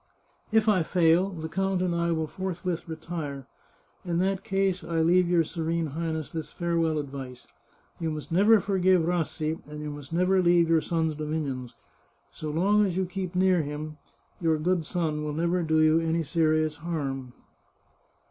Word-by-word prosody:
If 220 0 +3
I 205 -4 +4
fail, 170 +2 +3
the 160 -4 -6
count 190 +2 0
and 180 -2 0
I 170 0 0
will 160 -1 0
forthwith 180 0 -4
retire. 155 -4 -5 0.6
In 175 -2 -1
that 190 +1 0
case 195 -3 0
I 165 -1 -2
leave 175 +2 +4
your 175 -2 +4
Serene 165 -1 -2
Highness 160 -1 -3
this 160 -1 -5
farewell 165 -2 0
ad 140 -2 -5
vice: 130 -3 -8 0.5
You 165 - -1
must 155 +1 -6
never 205 +6 +5
forgive 185 -3 +2
Rassi, 160 -2 -1
and 150 0 -8
you 150 0 -5
must 145 -1 -9
never 185 +2 +3
leave 170 -1 +4
your 165 -1 +4
son's 160 -1 0
dominions. 145 -5 -4 0.6
So 155 - -6
long 195 +7 +3
as 185 -3 -1
you 190 - +1
keep 185 0 -5
near 185 -1 +3
him, 150 +1 -6 0.4
your 160 -2 +2
good 170 0 0
son 155 -4 -1
will 150 -1 -3
never 170 +3 0
do 160 -1 +2
you 155 +1 +5
any 165 0 0
serious 155 -1 +1
harm." 140 -6 -4
165 Hz, 170 wpm, -27 LUFS, 155-180 Hz, 0.6 s, never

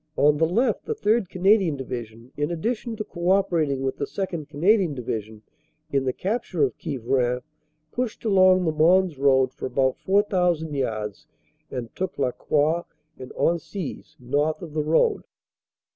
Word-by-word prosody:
On 150 +1 +4
the 160 +1 +3
left 235 +9 +1
the 450 - -2
3rd. 220 - +1
Canadian 190 -4 +3
Division, 120 -2 -7
in 145 +1 -1
addition 225 +7 -2
to 215 - -4
co 175 -3 -3
operating 165 -8 +2
with 135 - -2
the 140 - -2
2nd. 170 -6 -4
Canadian 175 +2 +2
Division 110 -3 -5 0.5
in 135 -1 +1
the 130 - +1
capture 185 - -2
of 135 - +1
Quievrain, 125 -1 -1 0.5
pushed 245 -2 -3
along 185 -3 +5
the 160 - +2
Mons 165 0 +3
road 130 -2 +3
for - - -5
about 130 0 0
4,000 180 -5 +1
yards 110 -1 -3 0.4
and 120 -3 -6
took 190 0 -3
La 130 -3 +1
Croix 155 +6 +1 0.4
and 130 -1 -9
Hensies, 170 0 -2
north 145 +7 -1
of 160 -3 -8
the 155 - 0
road. 165 - +2
155 Hz, 155 wpm, -24 LUFS, 130-190 Hz, 0.5 s, along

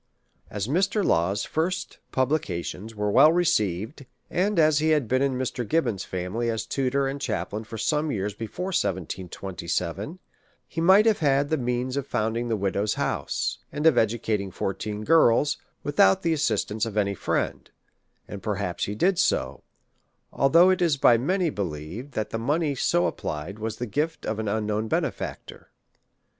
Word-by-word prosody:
As 105 +1 -3
Mr. 195 - +1
Law's 95 +5 +1
first 175 +4 -2
publications 115 - -2
were 105 0 -1
well 155 +9 +7
received, 115 - 0 0.2
and 195 +3 +1
as 155 -2 +4
he 155 +1 +1
had 150 -6 +2
been 130 +3 +1
in 140 -1 +1
Mr. 130 -1 -2
Gibbon's 120 - 0
family 95 +6 -3
as 115 -1 -2
tutor 135 0 0
and 135 +1 -4
chaplain 105 -2 -3
for 115 - -8
some 150 +6 0
years 105 -2 -2
before 115 - -5
1727, 95 - -3 0.5
he 165 - -4
might 190 +5 +6
have 220 -3 +3
had 140 -1 +2
the 160 - +2
means 125 +1 -2
of 140 -1 -3
founding 115 +2 -1
the 115 - +1
widows' 100 +1 0
house, - - -2
and 150 +2 -3
of 160 -5 +6
educating 110 -3 0
fourteen 105 +3 -4
girls, 145 0 +4 0.2
without 120 -10 +3
the 165 -1 +2
assistance 115 -7 0
of 110 -1 -6
any 100 -1 +2
friend; - - -2 0.6
and 100 - -7
perhaps 100 -4 -2
he 100 - -4
did 180 - +2
so, 65 - 0 0.7
although 165 +7 +5
it 185 - 0
is 165 -5 +3
by 120 - +6
many 170 +8 +1
believed, 95 - -5
that 110 -2 -3
the 115 - -2
money 145 +5 0
so 90 -9 +1
applied 85 +3 -4
was 110 0 -4
the 120 - -3
gift 150 +9 -2
of 110 0 -2
an 110 - -3
unknown 105 +1 -1
benefactor. - - -4
115 Hz, 160 wpm, -25 LUFS, 100-150 Hz, 0.7 s, well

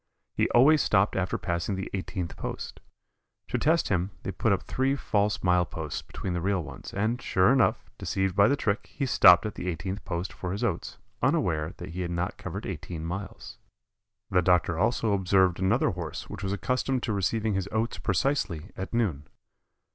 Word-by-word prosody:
He - - +1
always 145 +6 +6
stopped 100 0 +2
after 95 -1 0
passing 85 +2 -2
the 95 +1 -4
eighteenth 95 -2 -4
post. - - -6 0.7
To - - 0
test 160 +2 +2
him 90 -1 +1
they - - -3
put 100 +4 0
up 95 - +1
three 135 +1 0
false 105 -6 0
mile 90 -1 +4
posts 80 -3 -5
between 95 - -5
the 85 - -2
real 95 -1 0
ones, 65 -3 -9
and, 110 +5 -1
sure 95 +1 +3
enough, 130 -4 +1
deceived 95 -1 -1
by 100 +1 +6
the 140 - +3
trick, 110 -5 -1
he 140 - -2
stopped 90 -7 +7
at 105 - -3
the 90 - -6
eighteenth 95 +4 -4
post 85 0 -4
for 90 0 -4
his 100 - -3
oats, - - -2 0.2
unaware 75 +1 +1
that 90 - -7
he 90 +3 -5
had 85 - -2
not 85 +1 -3
covered 95 +4 -5
eighteen 80 -2 -5
miles. 95 +4 -6 0.7
The 90 -2 +4
doctor 85 -1 +3
also 110 +3 +1
observed 95 -2 +3
another 95 +7 +2
Horse 85 -4 -6
which - - -7
was 95 - -2
accustomed 125 +5 -1
to 110 - -1
receiving 105 +2 0
his 95 0 -2
oats 110 +2 -1
precisely 95 - -1
at 95 +5 -5
noon. 85 -12 0
95 Hz, 185 wpm, -27 LUFS, 90-110 Hz, 0.7 s, stopped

